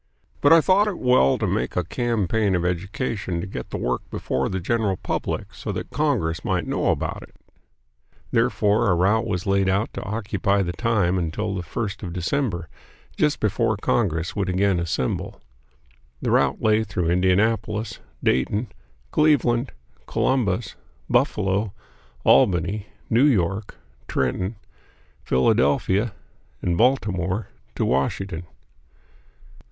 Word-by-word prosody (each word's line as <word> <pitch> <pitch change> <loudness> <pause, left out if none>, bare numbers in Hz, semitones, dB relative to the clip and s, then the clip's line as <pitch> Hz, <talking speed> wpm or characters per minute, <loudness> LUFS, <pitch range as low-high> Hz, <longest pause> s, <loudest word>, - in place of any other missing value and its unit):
But 145 - +5
I 165 0 +8
thought 195 +5 +4
it 200 -4 -2
well 125 - +4
to - - -1
make 65 - -1
a 90 - +1
campaign 105 0 0
of 90 0 0
education 95 +1 -2
to 85 - -3
get 80 -10 -7
the - - -4
work 60 0 -1
before 65 +1 -2
the 95 - -2
general 100 0 0
public - - -3
so - - -5
that - - -5
Congress 80 0 0
might - - 0
know - - -1
about - - -1
it. - - -14 1.0
Therefore 115 -2 +2
a 90 - +4
route 105 +6 +2
was 90 -5 -2
laid 100 -1 +2
out 100 +4 0
to - - -5
occupy 100 -1 0
the 85 - -2
time 100 -3 +1
until 95 +5 -2
the 95 - -3
first 105 +5 -4
of 90 -5 -5
December, 90 - -1 0.5
just 150 -1 +1
before 110 0 +1
Congress 85 -6 0
would 100 -2 -1
again 95 0 +2
assemble. 80 -6 -2 0.8
The - - -1
route - - +2
lay 110 0 +3
through 90 -5 -1
Indianapolis, 105 +4 +1 0.2
Dayton, 100 - +1 0.4
Cleveland, 135 -5 +2 0.4
Columbus, 115 -6 0 0.4
Buffalo, 100 0 +1 0.5
Albany, 90 +8 +3 0.2
New 120 +5 +4
York, 100 - +1 0.3
Trenton, 90 - -1 0.7
Philadelphia, 95 - +2 0.5
and 90 -1 +1
Baltimore, 105 -5 +1 0.3
to - - 0
Washington. 85 +6 -1
100 Hz, 130 wpm, -23 LUFS, 90-115 Hz, 1.0 s, I